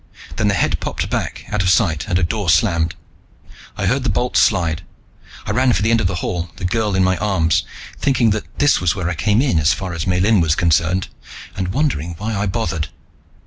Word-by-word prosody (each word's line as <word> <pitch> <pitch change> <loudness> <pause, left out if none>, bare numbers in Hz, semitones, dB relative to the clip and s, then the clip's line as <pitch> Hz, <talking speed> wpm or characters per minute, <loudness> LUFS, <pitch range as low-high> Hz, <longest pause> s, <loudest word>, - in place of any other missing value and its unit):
Then - - +1
the 100 - +2
head - - 0
popped - - -4
back - - -3
out 105 - 0
of 90 - +1
sight 85 -3 +2
and 90 -3 +1
a 90 - 0
door 100 +1 -1
slammed. 85 0 +2 0.8
I - - -1
heard 135 0 +1
the 130 - 0
bolt 120 +5 -1
slide. 85 -6 +2 0.6
I - - -2
ran 125 +3 +3
for 105 - 0
the 110 - +2
end 115 -1 +3
of 90 - +1
the 90 - -2
hall, 90 -1 -3
the - - -5
girl 105 0 0
in 95 - +3
my 95 0 +2
arms, 85 -4 +1 0.4
thinking 130 -5 +2
that 105 +1 -4
this 145 0 +3
was 90 -2 +1
where 90 -2 -2
I - - -1
came 105 - +1
in, 125 - +2
as 75 0 +3
far 95 -2 -5
as 85 +2 -4
Miellyn 95 +3 +3
was 80 -2 +2
concerned, 85 +2 +1 0.5
and 95 -1 -2
wondering 90 - -1
why 110 +3 -3
I 100 +1 -1
bothered. 90 -6 -2
95 Hz, 220 wpm, -19 LUFS, 85-110 Hz, 0.8 s, ran